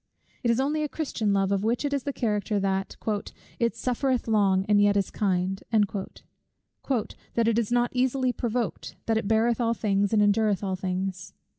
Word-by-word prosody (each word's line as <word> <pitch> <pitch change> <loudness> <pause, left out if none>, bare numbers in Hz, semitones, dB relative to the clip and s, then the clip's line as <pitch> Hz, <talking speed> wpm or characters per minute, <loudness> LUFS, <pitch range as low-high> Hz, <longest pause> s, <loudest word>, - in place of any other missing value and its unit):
It 240 - 0
is 235 +1 +3
only 295 +3 0
a 300 - -1
Christian 250 -10 -2
love 195 -1 +1
of 200 0 +1
which 235 +6 0
it 285 - -1
is 280 -3 -1
the 285 - -1
character, 210 -5 -1
that 195 0 -1 0.6
"it 235 -3 +1
suffereth 250 +1 -1
long, 195 -3 +3
and 205 -1 +4
yet 205 0 +4
is 200 - 0
kind;" 190 -1 0
"that 215 +3 -3
it 230 0 +3
is 230 -1 -2
not 240 0 +2
easily 255 0 +1
provoked, 240 -2 -3
that 225 -1 +1
it 205 - -4
beareth 225 +2 +2
all 230 0 +1
things, 200 -2 +1
and 215 -2 +4
endureth 205 -1 +2
all 190 -1 -1
things." 185 0 -4
220 Hz, 180 wpm, -26 LUFS, 195-240 Hz, 0.6 s, and